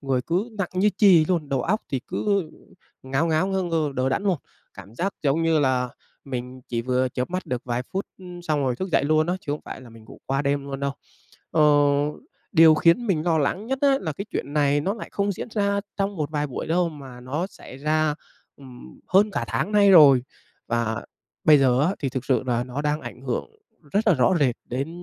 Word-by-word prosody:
người 135 -3 0
cứ 180 - -1
nặng 185 - -1
như 200 +3 +3
chì 185 -7 +6
luôn, 165 -4 -1
đầu 135 -2 0
óc 210 - 0
thì 135 - -1
cứ, - - -3 0.2
ừ, 155 - -9 0.5
ngáo 135 +5 0
ngáo, 165 +3 +1
ngơ 190 -1 -1
ngơ, 160 -4 -1
đờ 130 0 0
đẫn 135 - -1
luôn. 195 -3 +1 0.4
Cảm 100 +3 -12
giác 195 +8 -2
giống 150 +3 +1
như 165 -1 +3
là 130 -3 +1 0.4
mình 130 -1 -6
chỉ 115 -1 -2
vừa 130 +1 +1
chớp 125 +4 -4
mắt 185 +1 -3
được 125 -1 -3
vài 120 0 -2
phút, 190 +10 -5
ừm, 180 -2 -10
xong 155 -4 0
rồi 130 -3 0
thức 190 - -4
dậy 160 - +2
luôn 155 +1 +2
á, 175 - 0
chứ 145 - -4
không 150 - -4
phải - - -8
là 125 -2 -13
mình 115 -1 -15
ngủ - - -14
qua 135 +1 0
đêm 140 0 0
luôn 140 -1 -6
đâu. 140 0 -1 0.6
Ờ, 155 - +3 0.9
điều 160 -3 +7
khiến 170 +9 +3
mình 175 -7 +1
lo 165 -2 +2
lắng 180 +8 -1
nhất 265 +2 -2
á 275 -1 +4
là 155 - -3
cái 195 +7 -6
chuyện 140 - -4
này 145 -1 +2
nó 195 +8 -1
lại 225 - -8
không 200 0 0
diễn 190 - -6
ra 200 -2 0 0.2
trong 195 0 -1
một 150 -2 -3
vài 150 -1 -1
buổi 135 - -5
đâu, 175 +1 +1
mà 135 -6 -11
nó 145 +8 -3
xảy 160 - -13
ra, 155 +1 +1 0.4
ừm, 130 -3 -14
hơn 200 +3 +4
cả - - -2
tháng 210 - -2
nay 205 -1 +5
rồi. 145 -8 +8 0.4
Và 115 -1 -1 0.4
bây 150 -1 +7
giờ 130 -2 +3
á, 180 +6 +1
thì 140 - -2
thực 130 0 -4
sự 130 - +1
là 120 -1 0
nó 130 +3 -5
đang 150 +1 0
ảnh 130 - -9
hưởng 135 - -3 0.4
rất 210 +2 +1
là 180 - +5
rõ 130 +5 +3
rệt 130 -5 +2
đến 135 +5 -3
150 Hz, 235 wpm, -24 LUFS, 130-180 Hz, 0.9 s, rồi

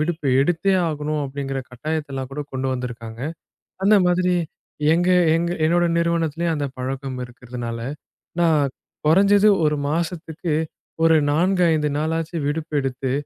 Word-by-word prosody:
விடுப்பு 155 -1 -1
எடுத்தே 175 +6 +2
ஆகணும் 150 0 -2
அப்டிங்கிற 135 0 -4
கட்டாயத்த 150 +3 -4
எல்லாம் 130 -1 -4
கூடக் 145 +1 -6
கொண்டு 130 0 -2
வந்து 125 -1 -3
இருக்காங்க. 115 -1 -9 0.6
அந்த 210 +1 +6
மாதிரி 180 0 +2 0.6
எங்க 175 +2 +1 0.3
எங்க 170 +1 0 0.2
என்னோட 175 +2 +3
நிறுவனத்திலயும் 170 -1 0
அந்தப் 140 -3 -4
பழக்கம் 130 0 -4
இருக்கறதுனால, 120 -1 -7 0.6
நான் 150 -5 +3 0.4
குறைஞ்சது 200 +5 +5 0.2
1 150 0 +2
மாசத்துக்கு 165 0 -2 0.5
ஒரு 165 0 +6 0.2
4, 180 +4 +2
5 150 -1 +1
நாளாச்சும் 160 0 -2
விடுப்பு 155 +1 -3
எடுத்து, 130 0 -2
155 Hz, 130 wpm, -22 LUFS, 135-170 Hz, 0.6 s, அந்த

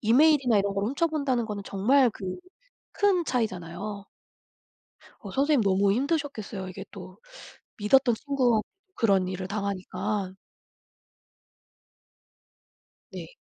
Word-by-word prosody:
이메일이나 255 0 +4
이런 200 0 0
걸 200 0 -1
훔쳐본다는 280 -2 0
거는 205 -2 -5
정말 245 +6 +3
그 200 - -10 0.7
큰 390 -4 +2
차이잖아요. 200 - -3 1.2
어 - - -8
선생님 280 -2 +2
너무 195 0 +3
힘드셨겠어요. 255 - -2
이게 185 - -8
또 - - -11 0.6
믿었던 240 +4 +4
친구 255 -5 +1 0.3
그런 195 -5 +2
일을 185 0 -4
당하니까. 200 0 -3 2.8
네. - - -7
215 Hz, 235 characters per minute, -27 LUFS, 195-275 Hz, 2.8 s, 이메일이나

